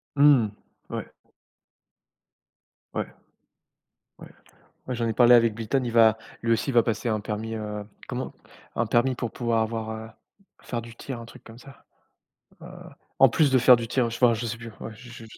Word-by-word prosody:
Mmh, 140 -6 +5 0.4
ouais. - - -5 1.9
Ouais. - - -1 1.1
Ouais. - - -12 0.6
Ouais, 130 - -2
j'en 115 -1 -1
ai 115 - -1
parlé 120 +1 +6
avec 115 -2 +5
Bliton, 115 +4 -1
il 120 - -3
va 110 -1 +5 0.2
lui 115 - 0
aussi 115 +5 -1
il - - -1
va 120 -1 +5
passer 115 +1 -2
un 110 -1 0
permis, 110 +1 -4
heu, 105 -1 -5 0.2
comment? - - -5 0.4
Un 120 - +1
permis 120 +4 +2
pour 120 -2 -4
pouvoir 115 -2 0
avoir, 110 0 -4
heu, 110 0 -7 0.5
faire 120 -1 -4
du 115 0 -12
tir 130 0 -7
un 115 - -9
truc 115 - -15
comme 115 0 -13
ça. 135 +2 -16 0.8
Heu, - - -9 0.5
en 135 - +8
plus 145 +4 +2
de 130 - +4
faire 125 +1 +7
du 115 -1 -5
tir, 125 0 +1
heu, 115 - -3
j 115 - -5
enfin, 120 -2 +6
je 115 +2 -4
sais 115 +1 -4
plus, 115 0 -9
ouais, 110 - -7
je 120 +3 -13
je 120 -1 -11
115 Hz, 195 wpm, -25 LUFS, 110-120 Hz, 1.9 s, en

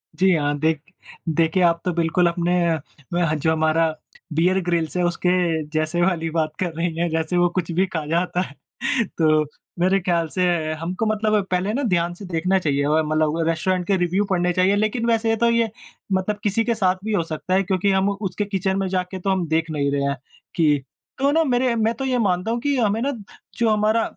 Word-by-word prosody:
जी 185 +3 +3
हाँ, 145 -1 0
देख 155 -1 +1 0.5
देखे 165 +3 +2
आप 170 -1 +3
तो 180 - +1
बिल्कुल 170 +1 +2
अपने 175 +1 +1
अ, 160 +1 -2
जो 160 +2 +1
हमारा 160 +1 +2 0.5
बीयर 180 +4 +2
ग्रिल्स 170 -1 -1
है 180 - +1
उसके 175 +1 0 0.4
जैसे 155 +2 0
वाली 175 -3 +1
बात 155 -1 -1
कर 175 -3 -2
रही 165 0 -2
हैं 170 0 0
जैसे 160 +2 -1
वो 175 0 +4
कुछ 170 -1 -1
भी 185 +3 +2
खा 160 -5 -4
जाता 175 +2 0
है 145 -6 -6 0.6
तो 155 -2 +4 0.4
मेरे 190 +2 +3
ख़याल 170 -2 0
से 185 +2 -1 0.4
हमको 185 +6 -2
मतलब 215 -1 +1
पहले 185 +4 0
ना 280 +3 -1
ध्यान 175 -5 +1
से 195 +3 -10
देखना 185 +2 +1
चाहिए। 140 -4 0
और 155 +1 +2
मतलब 155 +1 +1
रेस्टोरेंट 180 +2 0
के 200 - +3
रिव्यू 180 +3 +1
पढ़ने 180 -1 +1
चाहिए 185 +3 +3
लेकिन 215 +3 0
वैसे 225 -1 +2
तो 235 +1 +3
ये 230 -1 +2 0.4
मतलब 190 +3 0
किसी 210 +2 +1
के 235 0 +1
साथ 185 -4 +2
भी 220 - -1
हो 170 -5 +2
सकता 165 +3 -4
है। 195 - +3
क्योंकि 190 +1 +1
हम 190 +1 +2
उसके 200 0 -3
किचन 195 -1 -1
में 190 - -1
जाके 185 0 -2
तो 195 - -2
हम 185 -3 0
देख 160 +1 0
नहीं 140 -2 0
रहे 140 0 0
हैं 140 0 0 0.4
कि 150 -4 +2 0.4
तो 280 +1 +3
ना 325 +1 +3
मेरे 250 -3 +1
मैं 225 0 +1
तो 270 - -4
ये 255 -1 +1
मानता 185 0 0
हूँ 235 - -1
कि 285 0 0
हमें 220 -2 +1
ना 280 +3 0 0.5
जो 230 -2 +2
हमारा 215 +1 +2
180 Hz, 210 wpm, -22 LUFS, 165-205 Hz, 0.6 s, वो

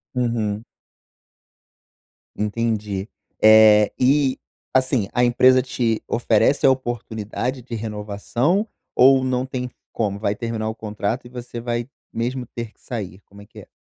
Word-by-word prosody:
Uhum. 115 -4 -1 1.7
Entendi. 105 -2 -2 0.3
Eh, 110 -1 +7
e, 135 +1 +3 0.3
assim, 130 -5 +2
a 125 - +2
empresa 130 +1 +5
te 120 -3 -1
oferece 120 +3 +2
a - - +7
oportunidade 120 0 -3
de 120 -1 -7
renovação, 110 - -1 0.3
ou 130 +1 +6
não 130 0 0
tem 125 -1 -4 0.2
como, 100 -3 -2
vai 105 -1 -1
terminar 110 -1 -3
o 110 - -5
contrato 110 +2 -3
e - - -11
você 120 -1 -7
vai 120 0 -3 0.2
mesmo 125 +2 -3
ter 115 -2 -5
que - - -35
sair, 100 -6 -6
como 100 +1 -15
é 100 - -13
que - - -14
é? - - -13
115 Hz, 140 wpm, -22 LUFS, 105-125 Hz, 1.7 s, Eh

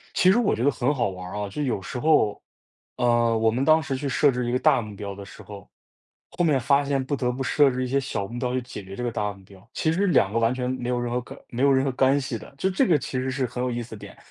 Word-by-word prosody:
其 185 - +5
实 205 - +4
我 235 -4 +2
觉 115 - -3
得 145 - +5
很 130 +3 0
好 120 -6 0
玩 90 -1 -7
儿 - - -5
啊， 105 -1 -3
就 150 +10 -4
有 125 -8 -1
时 95 - -6
候， 125 -7 +2 0.6
呃， 120 -1 +2
我 110 0 +3
们 125 +4 -1
当 155 +2 +5
时 140 -4 -3
去 140 +1 -3
设 145 +2 +3
置 125 -1 -2
一 120 - -1
个 125 - +2
大 - - +4
目 105 -1 -9
标 100 0 -6
的 100 0 -9
时 100 - -13
候， 100 -2 -11 0.6
后 175 0 -1
面 150 -5 +3
发 140 +3 +3
现 140 -1 0
不 145 +2 -2
得 125 -2 -1
不 130 +2 -4
设 140 +1 +3
置 130 0 -2
一 - - -2
些 135 +2 +1
小 105 -7 -3
目 120 +4 -7
标 125 0 -2
去 130 - +1
解 120 -4 -8
决 95 +1 -9
这 125 - -5
个 120 - -1
大 105 -2 -2
目 100 -1 -17
标， 95 0 -18
其 160 - 0
实 195 +5 +1
2 115 - +3
个 115 - +1
完 115 +2 +2
全 125 -1 -2
没 125 -1 -4
有 125 -1 0
任 120 0 -3
何 125 - 0
可 125 - -12
没 120 +2 -3
有 140 0 +5
任 130 0 +3
何 135 - 0
干 135 +2 +3
系 130 -4 -4
的。 105 - -14
就 190 - +1
这 215 +7 +2
个 165 -4 +4
其 130 - -4
实 130 +1 -1
是 130 0 -1
很 125 +1 -5
有 125 - -1
意 120 0 -3
思 115 - -13
的 - - -6
点。 - - -12
125 Hz, 340 characters per minute, -25 LUFS, 115-140 Hz, 0.6 s, 其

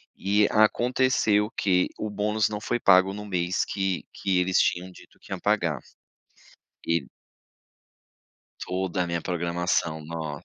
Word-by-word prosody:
E 100 +2 +2
aconteceu 110 -1 +2
que 90 -2 +2
o 110 - -3
bônus 105 +1 0
não 105 -1 -4
foi 120 +3 -2
pago 95 -2 +5
no 105 +1 -7
mês 90 -1 0
que 95 -2 -2
que 95 -2 0
eles 90 +1 +1
tinham 90 +1 0
dito - - -18
que - - -17
iam - - -3
pagar, - - 0 1.1
e 85 -4 0 1.6
Toda 90 -1 -1
a 90 - -2
minha 85 -1 -2
programação, 85 -2 -1
nossa. 80 -1 -6
95 Hz, 140 wpm, -26 LUFS, 85-105 Hz, 1.6 s, pago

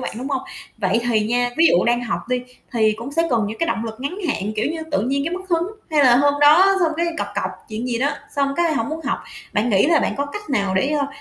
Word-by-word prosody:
bạn, - - -4
đúng 260 +3 -4
hông? 265 -2 -1 0.4
Vậy 205 +2 +1
thì 220 -2 +3
nha, 245 +1 +1
ví 330 +1 +6
dụ 175 - +4
đang 240 +1 +2
học 235 - -2
đi 250 0 0 0.3
thì 220 -2 +3
cũng 245 +5 -7
sẽ 330 +2 +2
cần 225 -4 +2
những 220 +1 -6
cái 330 - 0
động 225 - -1
lực 220 -1 -6
ngắn 285 +8 -4
hạn, 210 -5 -2
kiểu 220 +8 0
như, 325 -1 -4
tự 295 - +1
nhiên 275 +3 0
cái 335 +2 -2
mất 375 +1 -8
hứng, 340 0 +1 0.2
hay 295 -3 +4
là 245 -1 +6
hôm 285 +1 +3
đó 365 +7 +6
xong 325 -2 +2
cái 340 +1 0
cọc 205 - -1
cọc 205 - -1 0.2
chuyện 220 +3 -4
gì 235 -2 -1
đó, 285 +3 +1 0.2
xong 275 0 +1
cái 340 -2 +2
hổng 230 -1 -1
muốn 315 +1 -4
học. - - -1 0.3
Bạn 210 +3 +1
nghĩ 200 +7 +4
là 330 -1 +4
bạn - - -1
có 285 +1 -1
cách 415 +5 -8
nào 200 -7 0
để, 265 +9 +2
ơ, 290 -2 0
275 Hz, 285 wpm, -21 LUFS, 230-315 Hz, 0.4 s, ví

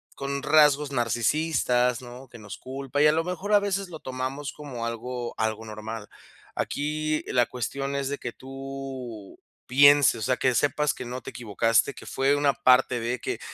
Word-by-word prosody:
con 140 0 -4
rasgos 150 -2 +4
narcisistas, 125 0 +1
¿no?, 125 +2 -11
que 115 -1 -13
nos 105 -1 -9
culpa, 135 +2 -3
y 150 - +7
a - - +6
lo 165 +1 +1
mejor, 180 +4 -3
a 205 - +7
veces, 200 -1 -2
lo 160 -2 -8
tomamos 130 +2 -4
como 130 -6 -6
algo 120 +1 -4
algo 110 0 -1
normal. 110 0 -7 0.5
Aquí 155 +1 -1
la 125 -1 +3
cuestión 135 +3 -4
es 140 -1 -1
de 145 - -3
que 120 - -5
tú 135 -5 -8 0.3
pienses, 140 0 +6
o 110 - -7
sea, 125 +3 +1
que 130 -1 +2
sepas 145 +2 +1
que 125 - -7
no 125 +1 -5
te - - -8
equivocaste, 115 +3 +1
que - - -11
fue 135 +2 +1
una 145 -1 +2
parte 125 -2 +4
de 120 +2 -2
que - - -4
130 Hz, 180 wpm, -26 LUFS, 120-145 Hz, 0.5 s, y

